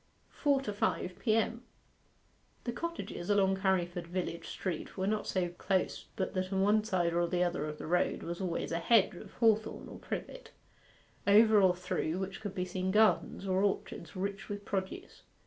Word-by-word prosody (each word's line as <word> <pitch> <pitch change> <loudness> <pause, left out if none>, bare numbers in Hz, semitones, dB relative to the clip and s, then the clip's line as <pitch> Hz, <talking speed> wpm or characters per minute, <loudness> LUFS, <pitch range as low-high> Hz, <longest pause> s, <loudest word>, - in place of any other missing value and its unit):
FOUR 280 -3 +2
TO 210 -6 -4
FIVE 185 -2 -1
P.M. 225 +1 +1 1.0
The 240 - -2
cottages 335 - -5
along 195 -2 +3
Carriford 175 -3 0
village 175 -1 -3
street 180 -1 -4
were 190 - 0
not 210 +1 0
so 180 -2 0
close 185 +2 -1
but 190 - -2
that 185 0 -2
on 190 -1 +1
one 210 +1 +4
side 180 -5 +1
or 170 - +2
other 175 -3 0
of 150 0 -5
the - - -7
road 175 +2 +1
was 170 +2 -4
always 175 -3 -2
a 165 - 0
hedge 205 +4 +4
of 175 - -11
hawthorn 220 -2 +1
or - - -9
privet, - - -6 0.8
over 215 +1 +7
or 185 -2 +5
through 175 -2 -2
which 190 +2 -4
could 205 -3 -5
be 180 - -1
seen 185 +1 -2
gardens 210 -1 +3
or 190 0 +2
orchards 195 -4 -2
rich 195 +1 -4
with 205 0 -5
produce. 200 - -4
190 Hz, 175 wpm, -32 LUFS, 180-210 Hz, 1.0 s, over